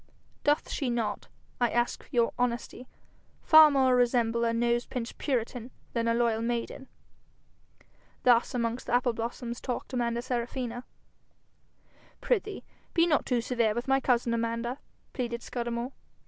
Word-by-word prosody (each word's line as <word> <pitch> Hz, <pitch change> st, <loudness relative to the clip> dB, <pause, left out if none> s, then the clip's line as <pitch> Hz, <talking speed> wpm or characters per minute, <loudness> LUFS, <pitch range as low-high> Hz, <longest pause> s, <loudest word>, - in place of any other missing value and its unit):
Doth 295 Hz, +1 st, +2 dB
she 270 Hz, -, -1 dB
not, 230 Hz, -3 st, -2 dB, 0.3 s
I 240 Hz, -1 st, +3 dB
ask 240 Hz, 0 st, -1 dB
your 235 Hz, -2 st, +1 dB
honesty, 245 Hz, +1 st, -2 dB, 0.6 s
far 315 Hz, -1 st, +9 dB
more 265 Hz, -3 st, +3 dB
resemble 235 Hz, -2 st, +2 dB
a 230 Hz, -, +2 dB
nose 235 Hz, +1 st, +1 dB
pinched 240 Hz, -3 st, -5 dB
puritan 245 Hz, -2 st, -2 dB, 0.2 s
than 230 Hz, -1 st, 0 dB
a 230 Hz, -, +2 dB
loyal 230 Hz, -2 st, +1 dB
maiden?' 240 Hz, +3 st, -3 dB, 1.4 s
Thus 245 Hz, 0 st, +4 dB
amongst 235 Hz, 0 st, -2 dB
the -, -, +2 dB
apple 245 Hz, -1 st, +2 dB
blossoms 235 Hz, +1 st, -5 dB
talked 250 Hz, 0 st, -4 dB
Amanda 235 Hz, -1 st, -1 dB
Serafina. 245 Hz, 0 st, -3 dB, 1.3 s
'Prithee, 420 Hz, -4 st, -1 dB, 0.3 s
be 335 Hz, -1 st, +5 dB
not 305 Hz, -5 st, +1 dB
too 245 Hz, -2 st, +1 dB
severe 230 Hz, -3 st, 0 dB
with 240 Hz, +2 st, -3 dB
my 270 Hz, 0 st, +3 dB
cousin, 240 Hz, -3 st, +1 dB
Amanda,' 230 Hz, +3 st, -2 dB, 0.3 s
pleaded 235 Hz, -2 st, -3 dB
Scudamore. 240 Hz, +1 st, -3 dB
240 Hz, 135 wpm, -29 LUFS, 235-255 Hz, 1.4 s, far